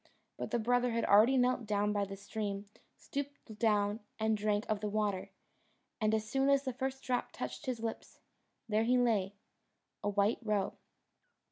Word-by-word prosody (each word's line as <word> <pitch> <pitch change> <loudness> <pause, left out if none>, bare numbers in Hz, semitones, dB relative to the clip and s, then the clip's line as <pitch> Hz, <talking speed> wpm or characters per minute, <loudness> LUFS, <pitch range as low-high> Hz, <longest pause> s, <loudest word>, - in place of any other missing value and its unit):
But - - -4
the 240 - +1
brother 245 +1 +2
had 230 - +1
already 220 +7 +6
knelt 250 -2 +2
down 210 0 +1
by 205 -1 +1
the 195 0 -7
stream, 200 0 -4 0.3
stooped 280 -6 -6
down, 210 -1 +2 0.2
and 220 0 +2
drank 210 0 0
of 215 -1 0
the 210 0 -2
water; 205 -2 -1 0.7
and 215 0 +3
as 215 0 -2
soon 270 +4 +2
as 275 0 +4
the 260 -2 -2
first 265 +1 -3
drop 250 -1 -1
touched 305 - -6
his 245 -3 -2
lips, 225 -1 -5 0.5
there 215 0 +2
he 250 +2 +4
lay 210 -5 +2 0.7
a 205 - +1
white 205 +2 +2
roe. 210 -4 0
220 Hz, 170 wpm, -33 LUFS, 205-245 Hz, 0.7 s, already